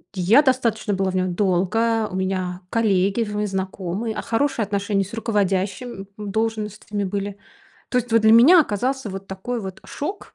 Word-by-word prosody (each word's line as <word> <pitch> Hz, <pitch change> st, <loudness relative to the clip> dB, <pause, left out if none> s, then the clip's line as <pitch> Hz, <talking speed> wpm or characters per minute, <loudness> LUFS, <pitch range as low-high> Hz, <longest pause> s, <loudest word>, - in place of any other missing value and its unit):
я 200 Hz, +10 st, +5 dB
достаточно 235 Hz, -6 st, +1 dB
была 190 Hz, -1 st, 0 dB
в -, -, -5 dB
нём 185 Hz, -1 st, 0 dB
долго. 210 Hz, +4 st, +1 dB
У -, -, -5 dB
меня 185 Hz, -1 st, -2 dB
коллеги 200 Hz, -1 st, +2 dB
в 210 Hz, 0 st, -2 dB
знакомые, 190 Hz, +3 st, -3 dB
а, -, -, -3 dB
хорошие 255 Hz, 0 st, 0 dB
отношения 200 Hz, 0 st, 0 dB
с 205 Hz, -, -13 dB
руководящим 200 Hz, -1 st, -1 dB
должностями 210 Hz, -1 st, -3 dB
были. 200 Hz, +1 st, -3 dB, 0.5 s
То 250 Hz, -, +1 dB
есть 235 Hz, -1 st, -3 dB
вот 230 Hz, -, +5 dB
для 220 Hz, 0 st, +6 dB
меня 300 Hz, +10 st, +8 dB
оказался 255 Hz, 0 st, -1 dB
вот 195 Hz, +1 st, -7 dB
такой 225 Hz, +5 st, -4 dB
вот 190 Hz, -2 st, -7 dB
шок 370 Hz, +8 st, -6 dB
210 Hz, 160 wpm, -22 LUFS, 190-230 Hz, 0.5 s, меня